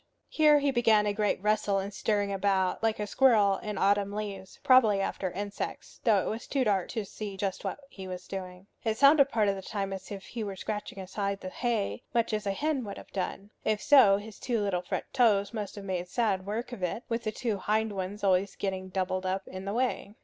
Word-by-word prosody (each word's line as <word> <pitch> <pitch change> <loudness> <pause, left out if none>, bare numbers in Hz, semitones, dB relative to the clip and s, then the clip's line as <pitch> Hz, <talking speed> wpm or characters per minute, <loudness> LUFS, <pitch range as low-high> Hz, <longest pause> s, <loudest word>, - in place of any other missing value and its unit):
Here 305 -1 +5
he 285 -1 +2
began 225 -4 +4
a 205 - +1
great 210 -2 0
rustle 210 -1 +2
and 195 +1 -3
stirring 205 0 0
about, 190 -1 +1
like 225 -1 +1
a 210 - -1
squirrel 210 -5 +4
in 210 -2 -5
autumn 200 +1 +2
leaves, 200 -2 -6
probably 255 -7 +6
after 195 -1 -2
insects, 205 +2 -6
though 215 -6 +4
it - - -4
was 220 +2 -4
too 275 -2 +1
dark 200 -5 +1
to 220 -4 -3
see 200 0 -7
just 190 -1 -2
what - - -3
he 190 -8 -9
was 180 -1 -7
doing. 185 -1 -7 0.2
It 220 -1 0
sounded 280 +1 +6
part 220 -5 +2
of 200 - +2
the 195 - -6
time 195 0 -3
as 190 -1 -7
if 195 -1 -7
he 235 -2 -5
were 200 -2 -4
scratching 205 +2 -5
aside 195 +1 -3
the 185 - -5
hay, 235 +1 -1
much 230 -1 +2
as 210 -1 -1
a - - +2
hen 290 +5 -1
would 200 - -6
have - - -12
done. 195 +1 -4
If 215 -1 +1
so, 265 -9 +6
his 210 +1 -10
two 240 -3 -1
little 200 -4 0
front 180 - -3
toes 215 -5 +3
must 210 -2 -4
have 200 -1 -8
made 180 -2 -2
sad 200 -3 0
work 225 +4 -3
of 240 -6 -7
it, 180 +7 -2
with 230 0 -1
the 215 - -1
two 220 -2 -2
hind 215 +1 0
ones 195 +2 -5
always 190 0 +2
getting 190 -1 -3
doubled 185 0 -1
up 190 +1 -2
in 185 +1 -7
the 200 - -2
way. 240 -4 -1
205 Hz, 230 wpm, -29 LUFS, 195-225 Hz, 0.2 s, probably